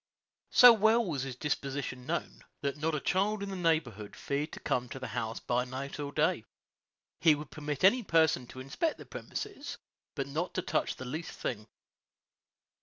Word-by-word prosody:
So 245 Hz, -2 st, +10 dB
well 220 Hz, +2 st, +4 dB
was 150 Hz, -8 st, -2 dB
his 135 Hz, -2 st, -4 dB
disposition 135 Hz, -2 st, -3 dB
known, -, -, -3 dB, 0.2 s
that 140 Hz, -1 st, -1 dB
not 155 Hz, +2 st, -1 dB
a -, -, 0 dB
child 200 Hz, +6 st, +1 dB
in 200 Hz, -, -4 dB
the -, -, -4 dB
neighborhood 155 Hz, -, 0 dB
feared 145 Hz, +3 st, -2 dB
to -, -, -7 dB
come 125 Hz, -1 st, -1 dB
to -, -, -6 dB
the 130 Hz, -2 st, -5 dB
house 115 Hz, 0 st, -3 dB
by 125 Hz, 0 st, 0 dB
night 130 Hz, +3 st, -6 dB
or 145 Hz, -1 st, -3 dB
day. -, -, +1 dB, 0.8 s
He 160 Hz, -3 st, +6 dB
would 150 Hz, -1 st, -8 dB
permit 150 Hz, -1 st, -4 dB
any 245 Hz, +7 st, +6 dB
person 160 Hz, -, +3 dB
to 130 Hz, -, -10 dB
inspect 135 Hz, -, -1 dB
the -, -, -11 dB
premises, 400 Hz, -9 st, -6 dB, 0.4 s
but 140 Hz, -3 st, -1 dB
not 155 Hz, +6 st, -3 dB
to 185 Hz, -, 0 dB
touch -, -, 0 dB
the 130 Hz, -, -8 dB
least 155 Hz, +7 st, -5 dB
thing. 110 Hz, -3 st, -4 dB
145 Hz, 180 wpm, -31 LUFS, 130-180 Hz, 0.8 s, So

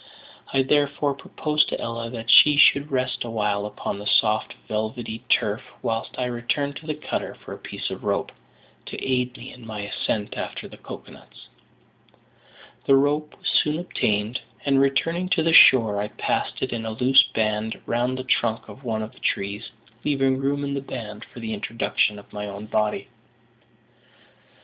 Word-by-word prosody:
I 135 Hz, -, +3 dB
therefore 145 Hz, +1 st, +1 dB
proposed 150 Hz, +2 st, 0 dB
to -, -, -3 dB
Ella 115 Hz, 0 st, -4 dB
that 115 Hz, -1 st, -2 dB
she 150 Hz, -1 st, +8 dB
should 145 Hz, 0 st, +6 dB
rest 130 Hz, -1 st, -1 dB
awhile 105 Hz, -3 st, -1 dB
upon 100 Hz, -1 st, -5 dB
the 105 Hz, -, -6 dB
soft, 110 Hz, 0 st, +2 dB
velvety 110 Hz, +1 st, -3 dB
turf, 110 Hz, -2 st, +2 dB, 0.2 s
whilst 115 Hz, 0 st, -2 dB
I 125 Hz, -, 0 dB
returned 125 Hz, +4 st, -2 dB
to 160 Hz, -, -12 dB
the 155 Hz, -, -1 dB
cutter 150 Hz, -, -4 dB
for -, -, -10 dB
a -, -, -8 dB
piece -, -, -5 dB
of -, -, -7 dB
rope, -, -, -1 dB, 0.6 s
to -, -, -6 dB
aid 125 Hz, -1 st, 0 dB
me -, -, -9 dB
in 125 Hz, -, -14 dB
my 110 Hz, -2 st, -6 dB
ascent 105 Hz, +1 st, -2 dB
after -, -, -5 dB
the -, -, -13 dB
cocoa -, -, -10 dB
nuts. -, -, -16 dB, 1.4 s
The 135 Hz, -, +7 dB
rope 145 Hz, +2 st, +1 dB
was -, -, -6 dB
soon 150 Hz, +1 st, +2 dB
obtained; 110 Hz, -, -1 dB, 0.2 s
and, 135 Hz, -1 st, +4 dB
returning 165 Hz, +7 st, +1 dB
to 170 Hz, -3 st, +2 dB
the 165 Hz, 0 st, +2 dB
shore, 110 Hz, -9 st, +7 dB
I 105 Hz, -, -2 dB
passed -, -, -2 dB
it 130 Hz, -, -2 dB
in 115 Hz, -1 st, -3 dB
a 110 Hz, -, -3 dB
loose 130 Hz, +4 st, +6 dB
band 110 Hz, 0 st, 0 dB
round 125 Hz, +2 st, 0 dB
the 130 Hz, -, -4 dB
trunk 115 Hz, -3 st, 0 dB
of 120 Hz, +7 st, -12 dB
one 110 Hz, -3 st, -2 dB
of 110 Hz, -, -7 dB
the -, -, -19 dB
trees, 100 Hz, +3 st, -2 dB, 0.3 s
leaving 135 Hz, -2 st, +2 dB
room 140 Hz, +1 st, 0 dB
in 140 Hz, 0 st, -2 dB
the 140 Hz, -, -2 dB
band 110 Hz, -6 st, -7 dB
for -, -, -13 dB
the 110 Hz, -1 st, -3 dB
introduction 105 Hz, 0 st, 0 dB
of 100 Hz, -, -14 dB
my 105 Hz, 0 st, -4 dB
own 100 Hz, +1 st, -7 dB
body. 105 Hz, 0 st, -1 dB
120 Hz, 180 wpm, -24 LUFS, 110-140 Hz, 1.4 s, she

